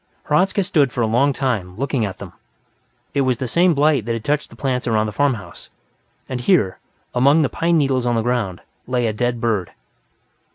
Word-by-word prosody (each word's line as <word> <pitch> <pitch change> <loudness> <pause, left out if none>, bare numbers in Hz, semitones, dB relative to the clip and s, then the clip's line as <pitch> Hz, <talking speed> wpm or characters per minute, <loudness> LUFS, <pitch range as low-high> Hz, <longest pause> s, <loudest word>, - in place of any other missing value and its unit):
Hradzka 190 +6 +2
stood 145 -7 +2
for 125 - -2
a - - +3
long 125 +6 +2
time, 110 -10 -2
looking 135 -3 -1
at 95 - -6
them. - - -10 0.8
It 140 - +1
was 130 -2 +1
the 130 - -3
same 175 +5 +3
blight 145 -5 +2
that 115 - -1
had 115 -1 -4
touched 150 +2 -1
the - - -14
plants 130 -2 -2
around 110 -2 +2
the 105 - -3
farmhouse. 125 -2 -2 0.6
And 125 -2 -4
here, 120 - +2 0.3
among 140 +5 +4
the 140 - 0
pine 170 0 +1
needles 135 -4 +1
on 120 - +1
the 115 - 0
ground, 115 -7 -1 0.3
lay 125 -1 0
a 110 - 0
dead 120 +2 -1
bird. 105 -7 -1
125 Hz, 200 wpm, -20 LUFS, 115-145 Hz, 0.8 s, among